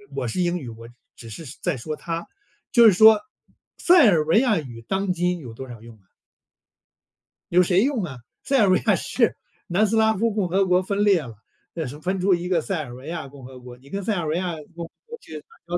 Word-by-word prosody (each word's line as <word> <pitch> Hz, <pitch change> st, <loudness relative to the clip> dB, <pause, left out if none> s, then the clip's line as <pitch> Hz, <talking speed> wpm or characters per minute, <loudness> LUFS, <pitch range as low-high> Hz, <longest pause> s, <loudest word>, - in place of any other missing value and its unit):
我 135 Hz, -3 st, -2 dB
是 115 Hz, -, -4 dB
英 175 Hz, 0 st, 0 dB
语， 130 Hz, -7 st, -7 dB
我 115 Hz, +1 st, -11 dB, 0.3 s
只 115 Hz, -, -12 dB
是 135 Hz, +9 st, -9 dB, 0.2 s
在 175 Hz, -4 st, -1 dB
说 155 Hz, +6 st, -5 dB
他。 165 Hz, 0 st, -5 dB, 0.5 s
就 235 Hz, -1 st, +6 dB
是 215 Hz, -, +8 dB
说， 220 Hz, +3 st, +7 dB, 0.6 s
塞 350 Hz, -7 st, +6 dB
尔 165 Hz, -7 st, +3 dB
维 165 Hz, +8 st, +4 dB
亚 240 Hz, -5 st, +2 dB
语 120 Hz, -6 st, -7 dB
当 190 Hz, 0 st, -1 dB
今 180 Hz, 0 st, -1 dB
有 120 Hz, -6 st, -10 dB
多 130 Hz, +3 st, -9 dB
少 115 Hz, -3 st, -11 dB
用 115 Hz, -1 st, -13 dB
呢？ 95 Hz, -3 st, -32 dB, 1.4 s
有 180 Hz, +1 st, +5 dB
谁 180 Hz, +2 st, +2 dB
用 255 Hz, -6 st, 0 dB
啊， 135 Hz, -7 st, -6 dB, 0.3 s
塞 275 Hz, -, +1 dB
尔 210 Hz, -, +4 dB
维 185 Hz, -, +5 dB
亚 -, -, +4 dB
是 -, -, 0 dB, 0.3 s
南 195 Hz, +5 st, +2 dB
斯 225 Hz, -, -1 dB
拉 220 Hz, 0 st, +3 dB
夫 225 Hz, +3 st, 0 dB
共 205 Hz, -3 st, -1 dB
和 195 Hz, +2 st, +2 dB
国 180 Hz, 0 st, +3 dB
分 200 Hz, +2 st, -1 dB
裂 195 Hz, -5 st, +4 dB
了， 120 Hz, -6 st, -10 dB, 0.4 s
那 165 Hz, -2 st, -4 dB
是 135 Hz, +4 st, -7 dB
分 185 Hz, +4 st, -2 dB
出 190 Hz, +1 st, +3 dB
一 175 Hz, +1 st, -5 dB
个 175 Hz, -, +2 dB
塞 160 Hz, 0 st, -3 dB
尔 120 Hz, -4 st, -10 dB
维 130 Hz, +3 st, -11 dB
亚 165 Hz, -3 st, -5 dB
共 135 Hz, -2 st, -13 dB
和 130 Hz, 0 st, -11 dB
国， 125 Hz, 0 st, -12 dB
你 135 Hz, +2 st, -19 dB
跟 200 Hz, +5 st, -4 dB
塞 215 Hz, +2 st, 0 dB
尔 175 Hz, -3 st, -2 dB
维 155 Hz, +2 st, -1 dB
亚 180 Hz, -1 st, -2 dB, 0.2 s
共 170 Hz, -1 st, -6 dB
和 -, -, -15 dB, 0.2 s
国 470 Hz, 0 st, -9 dB
去 -, -, -13 dB
打 -, -, -21 dB, 0.2 s
交 170 Hz, -, -9 dB
175 Hz, 265 characters per minute, -23 LUFS, 135-195 Hz, 1.4 s, 是